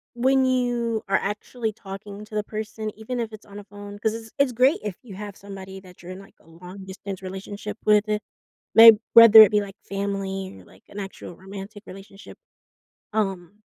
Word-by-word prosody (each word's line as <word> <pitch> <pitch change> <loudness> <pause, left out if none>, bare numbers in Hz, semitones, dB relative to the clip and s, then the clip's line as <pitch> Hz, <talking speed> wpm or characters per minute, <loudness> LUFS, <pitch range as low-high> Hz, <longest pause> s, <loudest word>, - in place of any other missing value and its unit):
when 265 +2 +3
you 240 -3 0
are 195 - +1
actually 220 +3 -4
talking 200 0 -10
to 215 0 -11
the 210 - 0
person, 215 0 -6
even 245 +3 -5
if 225 - -5
it's 215 -1 -12
on 205 0 -11
a - - -10
phone, 205 0 -11
'cause 220 0 0
it's 225 -1 -9
it's 280 -2 +2
great 255 +7 +3
if 205 -4 -4
you 215 -6 -11
have 205 0 -8
somebody 195 -1 -10
that 180 -1 -17
you're 180 +1 -9
in, 185 - -9
like, 195 - -16
a - - -26
long-distance 190 +3 -9
relationship 200 +3 -7
with, 210 0 +3
uh, 210 - 0 0.6
may 225 0 +11 0.2
whether 230 -1 +10
it 215 - +7
be, 210 -1 +2
like, 195 -1 -8
family 195 -1 -4
or, - - -16
like, - - -21
an 205 - -8
actual 195 -3 -8
romantic 195 +2 -10
relationship, 195 +2 -13 0.8
um 195 -1 -3
205 Hz, 190 wpm, -24 LUFS, 195-220 Hz, 0.8 s, may